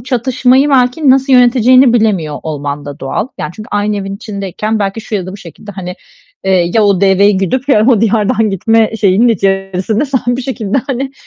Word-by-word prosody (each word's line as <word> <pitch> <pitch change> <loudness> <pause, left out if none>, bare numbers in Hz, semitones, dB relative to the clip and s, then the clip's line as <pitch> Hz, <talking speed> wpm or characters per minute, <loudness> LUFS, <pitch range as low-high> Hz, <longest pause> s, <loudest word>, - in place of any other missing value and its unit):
bu 235 - -15
çatışmayı 260 +2 +1
belki 260 +2 +2
nasıl 270 +1 +2
yöneteceğini 250 0 +4
bilemiyor 195 -10 0
olman 145 -2 -5
da 145 -1 -9
doğal. 135 - -3
Yani, 150 - -4
çünkü 215 - -10
aynı 205 0 -1
evin 195 0 -5
içindeyken 210 +1 -4
belki 200 +2 -3
şu 215 - -7
ya 185 -3 -2
da 185 - -7
bu 200 - -8
şekilde, 200 +3 -12
hani, 180 -1 -7 0.5
eee, 180 -2 +1
"Ya 220 -2 +3
o 200 -3 +2
deveyi 200 +1 +3
güdüp 255 +9 -2
ya 215 -4 +3
o 240 -6 +3
diyardan 220 0 +1
gitme" 225 +3 +1
şeyinin 215 +3 +2
içerisinde 195 +2 -1
sen 265 -2 -1 0.2
bir 260 - -5
şekilde, 240 -2 -2
hani, 270 0 -4
215 Hz, 190 wpm, -12 LUFS, 195-245 Hz, 0.5 s, yöneteceğini